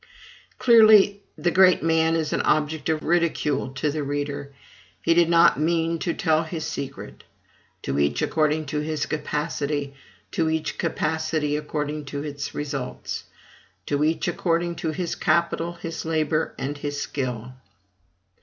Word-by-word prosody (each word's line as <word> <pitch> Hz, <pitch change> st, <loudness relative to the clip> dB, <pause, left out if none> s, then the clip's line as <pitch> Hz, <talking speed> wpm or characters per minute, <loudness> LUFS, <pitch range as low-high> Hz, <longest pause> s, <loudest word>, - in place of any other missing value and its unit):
Clearly, 215 Hz, -4 st, +6 dB, 0.2 s
the 175 Hz, -, +1 dB
great 185 Hz, 0 st, +5 dB
man 160 Hz, 0 st, +3 dB
is 155 Hz, -2 st, -1 dB
an -, -, +1 dB
object 155 Hz, 0 st, 0 dB
of 155 Hz, -1 st, 0 dB
ridicule 160 Hz, -5 st, +1 dB
to 150 Hz, +2 st, 0 dB
the 150 Hz, +1 st, -3 dB
reader; 145 Hz, 0 st, -3 dB, 0.5 s
he 165 Hz, -, +2 dB
did 170 Hz, 0 st, +4 dB
not 170 Hz, -2 st, +5 dB
mean 165 Hz, +1 st, +1 dB
to 170 Hz, -, -2 dB
tell 160 Hz, -1 st, +2 dB
his 160 Hz, -1 st, -5 dB
secret. 135 Hz, -, -6 dB, 0.6 s
"To 70 Hz, +1 st, -1 dB
each 70 Hz, 0 st, +1 dB
according 155 Hz, 0 st, +1 dB
to 150 Hz, -, +1 dB
his 155 Hz, 0 st, -2 dB
capacity, 150 Hz, -1 st, -2 dB, 0.4 s
to 160 Hz, -1 st, 0 dB
each 160 Hz, 0 st, -2 dB
capacity 155 Hz, -1 st, -1 dB
according 150 Hz, 0 st, -3 dB
to 140 Hz, +1 st, -5 dB
its 145 Hz, -1 st, -5 dB
results." 140 Hz, -3 st, -4 dB, 0.6 s
"To 145 Hz, 0 st, 0 dB
each 160 Hz, +2 st, +1 dB
according 170 Hz, 0 st, 0 dB
to 160 Hz, -, -2 dB
his 170 Hz, +2 st, -2 dB
capital, 170 Hz, 0 st, 0 dB
his 165 Hz, -1 st, -6 dB
labor, 160 Hz, -1 st, 0 dB
and 145 Hz, +2 st, -4 dB
his 145 Hz, 0 st, -3 dB
skill." 125 Hz, -3 st, -4 dB
155 Hz, 145 wpm, -24 LUFS, 145-165 Hz, 0.6 s, Clearly